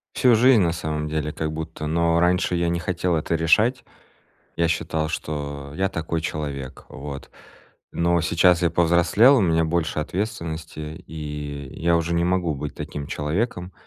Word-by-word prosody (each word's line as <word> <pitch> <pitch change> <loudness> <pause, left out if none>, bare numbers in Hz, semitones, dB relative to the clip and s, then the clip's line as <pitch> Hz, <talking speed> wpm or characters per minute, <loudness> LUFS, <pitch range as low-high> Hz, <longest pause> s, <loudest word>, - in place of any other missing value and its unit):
Всю 125 -2 +5
жизнь 120 0 +6
на 85 -2 +2
самом 75 -2 -3
деле 75 -1 -2
как 80 -1 -3
будто, 80 -1 -5
но 85 +1 +2
раньше 90 0 +2
я 85 0 +1
не 85 0 -1
хотел 90 0 -1
это 80 +1 -1
решать. 105 +10 +3 0.7
Я 85 -1 +1
считал, 80 -1 -1
что 70 -2 -5
я 95 +2 0
такой 85 -2 -3
человек. 70 -4 -5
Вот. 70 0 -8 0.6
Но 85 0 +2
сейчас 85 +2 +3
я 85 - +3
повзрослел, 85 - +4
у - - +2
меня 80 -3 +2
больше 80 -1 -1
ответственности 80 -4 -4
и 75 -3 -6
я 85 0 +3
уже 85 +1 -1
не 85 - +2
могу 90 -3 +1
быть 70 +1 -6
таким 75 -1 -6
человеком. 90 +4 -2
85 Hz, 160 wpm, -23 LUFS, 75-85 Hz, 0.7 s, жизнь